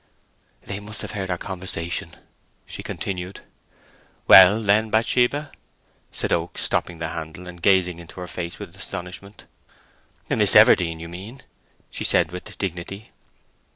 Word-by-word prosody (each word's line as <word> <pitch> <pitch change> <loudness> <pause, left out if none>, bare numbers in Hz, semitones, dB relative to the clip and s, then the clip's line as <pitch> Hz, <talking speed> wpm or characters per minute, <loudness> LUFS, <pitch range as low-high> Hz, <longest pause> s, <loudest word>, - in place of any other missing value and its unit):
"They 100 0 -5
must 105 +1 -5
have - - -5
heard 95 -2 -4
our 90 - -1
conversation," 90 -3 -4 0.5
she - - -7
continued. 95 0 -5 0.9
"Well, 95 +3 +9
then, 110 +1 +2
Bathsheba!" 125 +6 +1 0.6
said - - -2
Oak, - - -2
stopping 85 - -1
the 80 0 -4
handle, 80 +2 -7
and 90 -1 -11
gazing 90 -2 +3
into 85 +1 -12
her 90 - -6
face 85 -1 -5
with - - -9
astonishment. 95 +3 -8 0.8
"Miss - - +3
Everdene, 85 -2 +6
you 85 - -7
mean," 100 +10 -10 0.5
she - - -4
said, 80 - +3
with 90 0 -9
dignity. 95 +2 -5
90 Hz, 135 wpm, -23 LUFS, 85-100 Hz, 0.9 s, Well